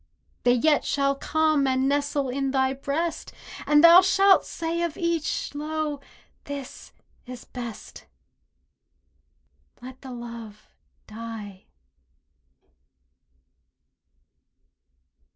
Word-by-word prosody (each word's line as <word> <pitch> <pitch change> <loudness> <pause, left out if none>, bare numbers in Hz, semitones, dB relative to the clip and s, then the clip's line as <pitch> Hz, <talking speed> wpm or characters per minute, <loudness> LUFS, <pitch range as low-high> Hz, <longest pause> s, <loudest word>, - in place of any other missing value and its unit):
They 245 0 +5
yet 295 +4 +2
shall 275 -1 +1
come 310 0 +1
and 260 0 +1
nestle 285 0 0
in 270 +1 -2
thy 265 0 +1
breast, 310 +5 -3 0.4
And 295 +1 +5
thou 340 +2 +10
shalt 385 +1 +4
say 335 +1 -3
of 340 -3 -2
each, 335 -4 -2
"Lo, 300 0 -3 0.5
this 280 -2 -8 0.4
is 250 -1 -9
best!" 235 -4 -9 1.7
Let 255 +1 -11
the 265 - -9
love 235 -3 -9 0.4
die! 215 -3 -9
280 Hz, 90 wpm, -25 LUFS, 250-310 Hz, 1.7 s, thou